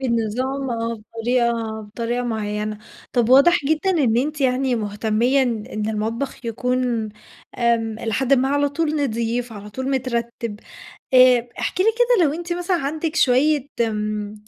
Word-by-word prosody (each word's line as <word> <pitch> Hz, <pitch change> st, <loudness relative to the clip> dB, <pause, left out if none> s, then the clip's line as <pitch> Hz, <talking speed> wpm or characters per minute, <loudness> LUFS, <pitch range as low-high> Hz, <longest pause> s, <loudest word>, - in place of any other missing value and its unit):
بالنظام 255 Hz, +3 st, -1 dB
آه. 230 Hz, 0 st, -2 dB
بطريقة 235 Hz, +2 st, -1 dB, 0.3 s
بطريقة 230 Hz, +3 st, -3 dB
معيّنة. 210 Hz, -2 st, -3 dB, 0.3 s
طب 240 Hz, -3 st, +2 dB
واضح 280 Hz, +5 st, +5 dB
جدًا 315 Hz, +6 st, +1 dB
إن 275 Hz, -11 st, +2 dB
أنتِ 295 Hz, +5 st, -1 dB
يعني 260 Hz, -1 st, +1 dB
مُهتميّة 220 Hz, +5 st, +1 dB
إن 230 Hz, -4 st, -2 dB
إن 215 Hz, 0 st, -3 dB
المطبخ 225 Hz, +5 st, -3 dB
يكون 245 Hz, -1 st, -1 dB, 0.5 s
آمم 230 Hz, -2 st, +1 dB
إلى 225 Hz, -1 st, -3 dB
حدٍ 265 Hz, +3 st, +1 dB
ما 265 Hz, 0 st, +4 dB
على 285 Hz, +1 st, +2 dB
طول 305 Hz, 0 st, -1 dB
نظيف، 235 Hz, 0 st, -2 dB
على 210 Hz, -1 st, -9 dB
طول 260 Hz, +5 st, -4 dB
مترتّب. 235 Hz, -4 st, -3 dB, 0.5 s
آآ 255 Hz, -2 st, +6 dB
احكِ -, -, -3 dB
لي -, -, +2 dB
كده 480 Hz, -7 st, +4 dB
لو 285 Hz, -, +1 dB
أنتِ 345 Hz, +1 st, -4 dB
مثلًا 355 Hz, +1 st, 0 dB
عندِك 310 Hz, +2 st, -3 dB
شويّة 285 Hz, +1 st, +3 dB
م 210 Hz, -2 st, -2 dB
245 Hz, 150 wpm, -21 LUFS, 225-275 Hz, 0.5 s, آآ